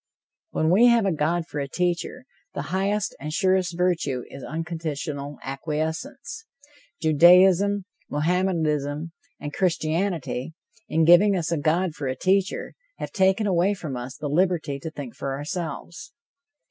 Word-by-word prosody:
When 160 Hz, -, +1 dB
we 225 Hz, +7 st, +6 dB
have 235 Hz, -3 st, +4 dB
a 195 Hz, -, +2 dB
God 165 Hz, +2 st, 0 dB
for 150 Hz, -, -5 dB
a 140 Hz, -, -2 dB
teacher, 180 Hz, -, -2 dB, 0.3 s
the 140 Hz, -, -3 dB
highest 200 Hz, +2 st, 0 dB
and 150 Hz, +2 st, -5 dB
surest 185 Hz, 0 st, +1 dB
virtue 165 Hz, -8 st, 0 dB
is 135 Hz, -, -9 dB
unconditional 155 Hz, -3 st, -4 dB
acquiescence. 160 Hz, -, -4 dB, 0.5 s
Judaism, 180 Hz, +5 st, +5 dB, 0.2 s
Mohammedanism 155 Hz, -2 st, 0 dB, 0.3 s
and 145 Hz, 0 st, -6 dB
Christianity, 165 Hz, -5 st, -1 dB, 0.3 s
in 160 Hz, 0 st, +2 dB
giving 190 Hz, +4 st, +6 dB
us 170 Hz, -1 st, -2 dB
a 165 Hz, -, +1 dB
God 165 Hz, +3 st, +1 dB
for 145 Hz, -3 st, -5 dB
a 130 Hz, -, -1 dB
teacher, 190 Hz, +6 st, 0 dB, 0.2 s
have -, -, -5 dB
taken 190 Hz, +2 st, +2 dB
away 190 Hz, +1 st, +2 dB
from 155 Hz, -8 st, -6 dB
us 125 Hz, +1 st, -6 dB
the 150 Hz, -, -4 dB
liberty 160 Hz, -3 st, 0 dB
to 160 Hz, -, -5 dB
think 145 Hz, -6 st, -8 dB
for 135 Hz, -1 st, -3 dB
ourselves. 165 Hz, +2 st, -6 dB
165 Hz, 140 wpm, -24 LUFS, 150-190 Hz, 0.5 s, we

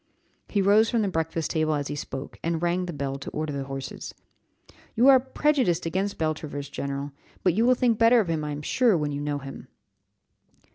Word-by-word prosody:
He 200 Hz, -2 st, +1 dB
rose 210 Hz, +3 st, +5 dB
from 230 Hz, -2 st, +1 dB
the -, -, 0 dB
breakfast 165 Hz, -2 st, -2 dB
table 155 Hz, -1 st, +1 dB
as 145 Hz, -1 st, -2 dB
he -, -, -4 dB
spoke, 135 Hz, -1 st, -7 dB
and 165 Hz, 0 st, -1 dB
rang 180 Hz, +1 st, 0 dB
the -, -, -3 dB
bell 140 Hz, -2 st, -4 dB
to 145 Hz, -, -6 dB
order 155 Hz, -1 st, -3 dB
the 140 Hz, -1 st, -3 dB
horses. 135 Hz, -1 st, -7 dB, 0.8 s
"You 240 Hz, +4 st, +4 dB
are 265 Hz, -1 st, +8 dB
prejudiced 260 Hz, -, +1 dB
against 190 Hz, +4 st, -1 dB
Beltravers, 155 Hz, -3 st, -3 dB
general; 140 Hz, +1 st, -4 dB, 0.3 s
but 180 Hz, -, +3 dB
you 225 Hz, +6 st, +2 dB
will 255 Hz, -, +5 dB
think 240 Hz, -3 st, +1 dB
better 230 Hz, +1 st, +6 dB
of 210 Hz, -, 0 dB
him, 160 Hz, -2 st, -1 dB
I 150 Hz, -, -3 dB
am 145 Hz, 0 st, -5 dB
sure, 235 Hz, -, +3 dB
when 150 Hz, -2 st, -1 dB
you 145 Hz, 0 st, -3 dB
know 145 Hz, 0 st, -2 dB
him." 135 Hz, -1 st, -9 dB
165 Hz, 205 wpm, -26 LUFS, 145-210 Hz, 0.8 s, are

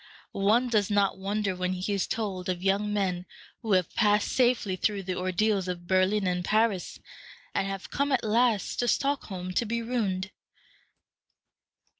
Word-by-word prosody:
One 215 Hz, +6 st, +2 dB
does 215 Hz, -4 st, +1 dB
not 200 Hz, -2 st, +1 dB
wonder 200 Hz, 0 st, -1 dB
when 180 Hz, 0 st, -1 dB
he 185 Hz, +3 st, -2 dB
is 195 Hz, -, 0 dB
told 190 Hz, -5 st, -3 dB
of 180 Hz, 0 st, -2 dB
young 200 Hz, +2 st, +1 dB
men 185 Hz, -3 st, -1 dB, 0.3 s
who 220 Hz, -4 st, 0 dB
have 185 Hz, -2 st, +2 dB
passed 210 Hz, -2 st, +2 dB
safely 240 Hz, -6 st, +2 dB
through 200 Hz, +1 st, -1 dB
the 185 Hz, 0 st, -3 dB
ordeals 185 Hz, +2 st, 0 dB
of 175 Hz, -1 st, -4 dB
Berlin 190 Hz, +3 st, +2 dB
and 180 Hz, -1 st, 0 dB
Paris, 215 Hz, -2 st, 0 dB, 0.5 s
and 195 Hz, -, 0 dB
have 195 Hz, -1 st, -6 dB
come 285 Hz, 0 st, 0 dB
at 265 Hz, -, +2 dB
last 225 Hz, -1 st, +1 dB
to 245 Hz, -, +1 dB
Stockholm 200 Hz, -10 st, -1 dB
to 235 Hz, -, +1 dB
be 235 Hz, +1 st, -2 dB
ruined. 200 Hz, -5 st, -2 dB
200 Hz, 160 wpm, -28 LUFS, 185-220 Hz, 0.5 s, One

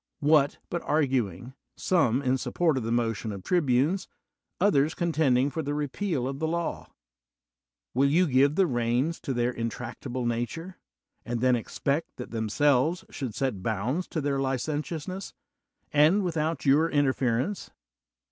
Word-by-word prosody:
What, 145 Hz, -1 st, +3 dB
but 170 Hz, -, -1 dB
arguing, 130 Hz, -, 0 dB, 0.2 s
some 140 Hz, -8 st, +2 dB
in 130 Hz, 0 st, +1 dB
support 165 Hz, +3 st, +1 dB
of 130 Hz, -, -1 dB
the 115 Hz, 0 st, -3 dB
motion 115 Hz, -2 st, -1 dB
of 100 Hz, -2 st, -7 dB
tribunes; 155 Hz, -, +1 dB, 0.5 s
others 160 Hz, -6 st, +3 dB
eon 170 Hz, -1 st, +1 dB
tending 140 Hz, -3 st, +2 dB
for 160 Hz, -, -2 dB
the 145 Hz, -1 st, -3 dB
repeal 150 Hz, -1 st, -2 dB
of 135 Hz, +1 st, -4 dB
the 160 Hz, -, 0 dB
law? 170 Hz, +1 st, -3 dB, 1.0 s
Will 135 Hz, +3 st, +3 dB
you 175 Hz, +6 st, +4 dB
give 140 Hz, 0 st, +3 dB
the 195 Hz, -, +4 dB
reins 125 Hz, +3 st, 0 dB
to -, -, -4 dB
their 120 Hz, -1 st, +1 dB
intractable 120 Hz, +2 st, -4 dB
nature, 120 Hz, +10 st, -3 dB, 0.4 s
and 120 Hz, +1 st, -3 dB
tiien 125 Hz, +1 st, +3 dB
expect 140 Hz, +6 st, -2 dB
that 125 Hz, -, -8 dB
themselves 130 Hz, -, +1 dB
should 130 Hz, -6 st, -5 dB
get 130 Hz, -9 st, -1 dB
bounds 125 Hz, -, -1 dB
to 160 Hz, -, -3 dB
their 140 Hz, -1 st, 0 dB
licentiousness, 150 Hz, +7 st, -3 dB, 0.6 s
and 155 Hz, +8 st, +5 dB
without 160 Hz, -2 st, -1 dB
your 150 Hz, +4 st, +4 dB
interference? 135 Hz, -, 0 dB
140 Hz, 145 wpm, -27 LUFS, 125-160 Hz, 1.0 s, and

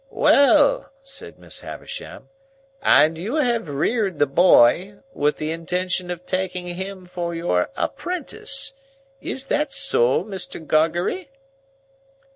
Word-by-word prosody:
"Well!" -, -, +4 dB
said 275 Hz, 0 st, -8 dB
Miss -, -, -7 dB
Havisham. 485 Hz, -, -9 dB, 0.5 s
"And 160 Hz, +1 st, +4 dB
you 215 Hz, -, -3 dB
have 240 Hz, -, 0 dB
reared 190 Hz, -, 0 dB
the 145 Hz, -, +4 dB
boy, 175 Hz, +4 st, +4 dB, 0.2 s
with 150 Hz, +1 st, 0 dB
the 155 Hz, +1 st, -3 dB
intention 180 Hz, +2 st, -2 dB
of 175 Hz, 0 st, -6 dB
taking 185 Hz, -1 st, -2 dB
him 185 Hz, +1 st, -6 dB
for 175 Hz, -1 st, -4 dB
your 130 Hz, -, 0 dB
apprentice; 355 Hz, -5 st, -1 dB, 0.5 s
is 265 Hz, -, -3 dB
that 295 Hz, +1 st, 0 dB
so, 120 Hz, +7 st, +2 dB
Mr. 190 Hz, -4 st, -5 dB
Gargery?" 170 Hz, -, 0 dB
180 Hz, 115 wpm, -22 LUFS, 165-245 Hz, 0.5 s, Well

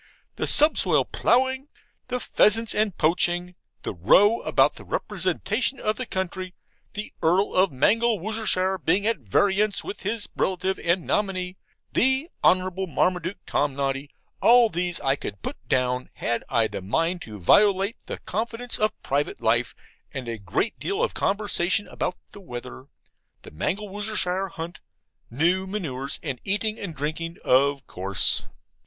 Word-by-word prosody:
The -, -, -2 dB
subsoil 180 Hz, -, +5 dB
ploughing; 260 Hz, +3 st, +1 dB, 0.4 s
the 250 Hz, 0 st, -2 dB
pheasants 225 Hz, -1 st, +3 dB
and 210 Hz, -4 st, 0 dB
poaching; 175 Hz, +2 st, +1 dB, 0.3 s
the -, -, -3 dB
row 200 Hz, -, +4 dB
about -, -, +3 dB
the -, -, -11 dB
representation 210 Hz, -, -1 dB
of 215 Hz, 0 st, -1 dB
the 255 Hz, -, -5 dB
county; 185 Hz, 0 st, -4 dB, 0.4 s
the 210 Hz, +1 st, -6 dB
Earl 180 Hz, +5 st, +2 dB
of 185 Hz, +1 st, +4 dB
Mangelwurzelshire 205 Hz, -, +1 dB
being 190 Hz, +5 st, +2 dB
at 225 Hz, -5 st, +1 dB
variance 200 Hz, -, +1 dB
with -, -, -6 dB
his 210 Hz, +2 st, -2 dB
relative 190 Hz, 0 st, -1 dB
and 175 Hz, +1 st, 0 dB
nominee, 185 Hz, -3 st, -1 dB, 0.4 s
the 265 Hz, +6 st, +2 dB
Honourable 185 Hz, +1 st, +2 dB
Marmaduke 180 Hz, +3 st, -1 dB
Tomnoddy; 140 Hz, 0 st, -1 dB, 0.3 s
all 240 Hz, 0 st, +6 dB
these 175 Hz, 0 st, 0 dB
I 135 Hz, -1 st, +2 dB
could 100 Hz, -7 st, -7 dB
put -, -, -4 dB
down, 125 Hz, 0 st, 0 dB
had 120 Hz, 0 st, -2 dB
I 115 Hz, -3 st, +3 dB
a 110 Hz, -, -3 dB
mind 165 Hz, -, -1 dB
to 110 Hz, -2 st, -8 dB
violate 200 Hz, -, +4 dB
the -, -, -4 dB
confidence 230 Hz, +4 st, -2 dB
of 215 Hz, 0 st, 0 dB
private 145 Hz, +2 st, -1 dB
life; 115 Hz, 0 st, +1 dB, 0.4 s
and 130 Hz, -2 st, -6 dB
a 115 Hz, -2 st, -4 dB
great 100 Hz, -, -2 dB
deal 400 Hz, +4 st, -1 dB
of -, -, 0 dB
conversation 195 Hz, -2 st, 0 dB
about 180 Hz, -, -3 dB
the 205 Hz, -, -12 dB
weather, 125 Hz, -4 st, -8 dB, 0.6 s
the -, -, -12 dB
Mangelwurzelshire 195 Hz, -, -2 dB
Hunt, 165 Hz, +1 st, -7 dB, 0.5 s
new 175 Hz, +9 st, +1 dB
manures, 145 Hz, -9 st, -3 dB
and 135 Hz, -6 st, -4 dB
eating 215 Hz, +2 st, -1 dB
and 175 Hz, -6 st, -6 dB
drinking, 160 Hz, +4 st, -4 dB
of 140 Hz, +2 st, +3 dB
course. 95 Hz, -1 st, 0 dB
185 Hz, 140 wpm, -25 LUFS, 140-210 Hz, 0.6 s, all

